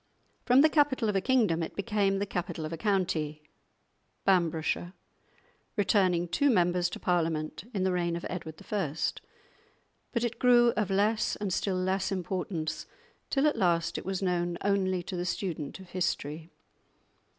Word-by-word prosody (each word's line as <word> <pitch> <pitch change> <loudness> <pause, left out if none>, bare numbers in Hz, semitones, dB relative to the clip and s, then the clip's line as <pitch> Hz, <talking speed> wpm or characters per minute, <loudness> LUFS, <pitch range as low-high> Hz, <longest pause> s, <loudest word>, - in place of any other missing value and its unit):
From 255 +2 +7
the 310 - +7
capital 285 -7 +2
of 205 - -1
a 195 - +2
kingdom 220 -9 +2
it 165 - -4
became 200 -2 +1
the 200 - -1
capital 175 -4 -4
of 155 - -5
a - - -4
county 170 -7 -1 0.8
(Bamburghshire), 175 -1 +1 0.8
returning 185 -4 +2
two 280 +12 +2
members 180 -4 +2
to - - -7
Parliament 165 -1 -1
in 195 -5 -1
the 190 - +2
reign 175 -1 0
of 170 - -5
Edward 160 -3 -6
I.; 180 -9 -1 1.2
but 235 -2 -1
it 235 -1 -2
grew 240 -1 +6
of 210 -2 0
less 210 +3 +1
and 200 -3 -3
still 190 0 0
less 190 +1 0
importance, 180 -3 -3 0.4
till 275 +1 +2
at 300 - +2
last 170 -2 +1
it - - -3
was 190 0 -3
known 175 -1 0
only 190 -2 +1
to 185 - -6
the 175 - -2
student 175 -4 -3
of 190 -2 -13
history. 160 -3 -2
185 Hz, 160 wpm, -29 LUFS, 170-205 Hz, 1.2 s, From